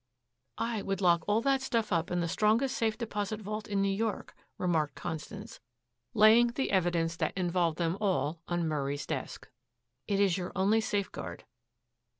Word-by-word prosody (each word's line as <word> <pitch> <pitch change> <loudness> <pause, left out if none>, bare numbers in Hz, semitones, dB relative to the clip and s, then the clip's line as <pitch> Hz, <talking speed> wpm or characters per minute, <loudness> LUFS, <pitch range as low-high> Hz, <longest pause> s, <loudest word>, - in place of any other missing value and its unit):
"I 230 -2 -1
would 195 -1 -2
lock 170 -3 +3
all 210 +2 +3
that 270 +1 +2
stuff 230 -6 0
up 165 0 0
in 180 0 0
the 170 - 0
strongest 220 +9 +2
safe 220 -1 0
deposit 210 -2 -3
vault 215 +1 -5
in 200 -1 0
New 195 0 +1
York," 220 +1 -2 0.2
remarked 160 -5 0
Constance, 160 -3 -6 0.6
laying 220 +3 +7
the 255 +3 -2
evidence 170 -3 +1
that - - -1
involved 175 -3 +1
them 170 +1 0
all 170 -5 0
on 175 -1 0
Murray's 145 -2 -2
desk. - - -5 0.6
"It 200 -1 +1
is 195 -2 +3
your 180 - -5
only 205 +4 +3
safeguard." 195 - -3
195 Hz, 160 wpm, -30 LUFS, 170-215 Hz, 0.6 s, laying